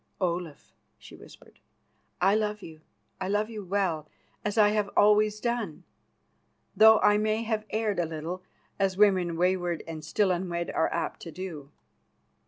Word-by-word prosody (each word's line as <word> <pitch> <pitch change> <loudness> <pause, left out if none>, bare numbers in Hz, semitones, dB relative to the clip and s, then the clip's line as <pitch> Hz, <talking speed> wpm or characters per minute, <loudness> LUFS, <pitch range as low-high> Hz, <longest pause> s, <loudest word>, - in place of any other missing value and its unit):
"Olaf," 175 -5 -3 0.2
she - - -14
whispered, - - -17 0.6
"I 190 +3 +4
love 210 -1 -1
you, 160 -1 -11 0.4
I 185 - -3
love 210 +3 0
you 215 -2 -6
well, 180 -5 -1 0.3
as 210 +1 -2
I 210 -1 +6
have 210 -1 0
always 210 0 +4
done, 235 -8 -3 0.9
though 220 +2 +8
I 210 0 +4
may 215 +1 0
have 215 -1 -2
erred 215 -3 -1
a 175 - +1
little, 165 +3 -5 0.4
as 195 -1 +1
women 185 -5 +3
wayward 175 -1 0
and 160 -1 -7
still 190 +5 +1
unwed 175 -1 -2
are 160 - 0
apt 170 - -3
to 165 - -9
do. 160 -6 -7
190 Hz, 155 wpm, -28 LUFS, 170-210 Hz, 0.9 s, though